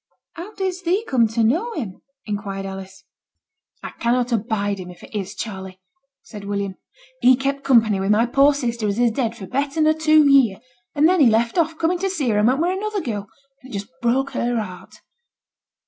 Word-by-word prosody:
'How 360 +6 -9
didst 375 -2 -3
thee 375 +6 0
come 240 -4 +3
to 225 +1 0
know 345 - +1
him?' 215 - -6 0.2
inquired 200 -2 -4
Alice. 190 0 -8 0.8
'I - - -6
cannot 245 +1 +1
abide 205 -3 -1
him 180 -1 -8
if 180 - -13
it - - -14
is 195 -3 -4
Charley,' 190 -4 -7 0.4
said 210 -3 -10
William. 200 -1 -3 0.5
'He 255 +1 +6
kept 275 +2 -2
company 225 -6 +4
with 195 +1 -1
my 215 +3 +4
poor 275 +4 +4
sister 235 -5 -2
as 200 +1 -1
is 240 -1 +3
dead 230 -1 -2
for 195 - -8
better 280 +6 -2
nor 310 0 +4
two 310 -1 +4
year, 265 -8 +5 0.4
and 300 +2 +5
then 365 +1 +3
he 270 -6 +6
left 230 +1 +1
off 325 -1 0
coming 345 +3 0
to 390 +1 -1
see 300 -10 -1
her 210 -2 +2
and 210 - +3
went 260 +3 +2
wi' 350 +3 +1
another 420 +2 -2
girl, 210 - -4 0.3
and 260 - -14
it 210 - -4
just 200 - -7
broke 260 +4 +1
her 240 0 -1
heart.' 185 -4 -8
240 Hz, 205 wpm, -21 LUFS, 205-300 Hz, 0.8 s, He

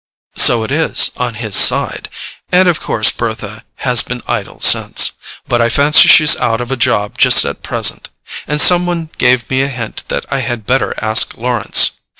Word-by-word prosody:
"So 115 -2 +4
it 110 - -7
is, 160 +3 +1
on 120 -2 -4
his 110 -3 -4
side. - - +3 0.4
And 185 +1 +3
of 175 -3 0
course 110 - 0
Bertha 110 -2 -7 0.2
has 125 -3 +3
been 125 -1 -7
idle - - -5
since. - - +3 0.4
But 120 -1 -1
I 115 - 0
fancy 145 +6 +4
she's 155 -2 +5
out 115 -1 -2
of 120 +1 -7
a - - -1
job 105 -4 -2
just - - +4
at - - -6
present—and 150 +1 -4
some 175 +2 +4
one 165 -2 -5
gave 125 -2 +1
me 130 0 0
a 135 - -1
hint 120 -5 -7
that - - -5
I 140 - -2
had 120 -3 -6
better 130 +4 -2
ask 110 +1 0
Lawrence. 120 -3 +1
125 Hz, 180 wpm, -12 LUFS, 115-140 Hz, 0.4 s, she's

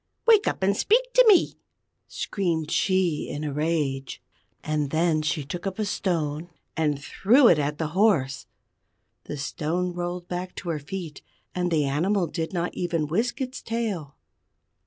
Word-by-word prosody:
Wake 440 -3 +5
up - - -1
and 195 +1 +3
speak - - +2
to - - +7
me!" 395 -5 +5 0.5
screamed 165 -6 -2
she 185 -5 +1
in 145 - -4
a 150 -2 -3
rage. 145 -3 -1 0.4
And 150 -2 -1
then 160 0 +2
she 155 -1 -1
took 175 +6 -5
up 190 - -4
a 215 - -1
stone, 165 -5 -2 0.3
and 150 -3 +1
threw 235 - +4
it 165 - +5
at 145 +1 -1
the 160 -1 -2
horse. 160 -8 +1 0.8
The 150 - -5
stone 165 +5 -2
rolled 175 0 -4
back 180 +1 -5
to 175 - -6
her 160 -2 -1
feet, 160 0 -7 0.3
and 180 -1 -1
the 155 -4 +2
animal 175 +8 +1
did 165 0 -4
not 175 -2 -2
even 170 -3 -1
whisk 225 - -1
its 260 +1 -4
tail. 210 -11 -3
170 Hz, 160 wpm, -25 LUFS, 150-195 Hz, 0.8 s, to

